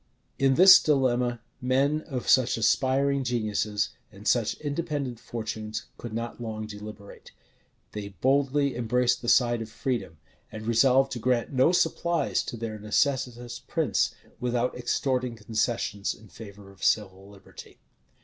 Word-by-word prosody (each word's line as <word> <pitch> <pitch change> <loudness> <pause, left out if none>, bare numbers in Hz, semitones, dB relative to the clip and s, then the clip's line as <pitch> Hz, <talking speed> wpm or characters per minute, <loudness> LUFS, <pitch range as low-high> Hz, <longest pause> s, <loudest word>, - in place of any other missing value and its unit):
In 135 -1 +3
this 185 +4 +9
dilemma, 125 -5 +1 0.2
men 135 +4 +1
of 130 -6 -5
such 130 -3 +4
aspiring 135 +4 +2
geniuses, 110 -4 -1 0.2
and - - -10
such - - +2
independent 145 -5 -3
fortunes, 110 -1 -5
could 120 - -7
not 115 +2 -5
long 110 -2 -5
deliberate: 105 -1 -10 0.6
they 105 -1 -6
boldly 140 - +2
embraced 125 +1 +1
the 120 - -2
side 120 -2 +3
of 110 - -6
freedom, 110 -11 -3 0.3
and 110 0 -8
resolved 130 +4 +4
to 120 - -4
grant 125 +2 0
no 130 +5 +4
supplies 170 -1 +1
to 120 - -6
their 110 -1 -5
necessitous 120 +1 -1
prince, - - 0 0.2
without 125 0 -1
extorting 125 0 -1
concessions 110 -2 -2
in 110 -1 -17
favor 100 -2 -12
of 95 - -15
civil 95 -2 0
liberty. 100 -2 -14
120 Hz, 135 wpm, -27 LUFS, 110-130 Hz, 0.6 s, this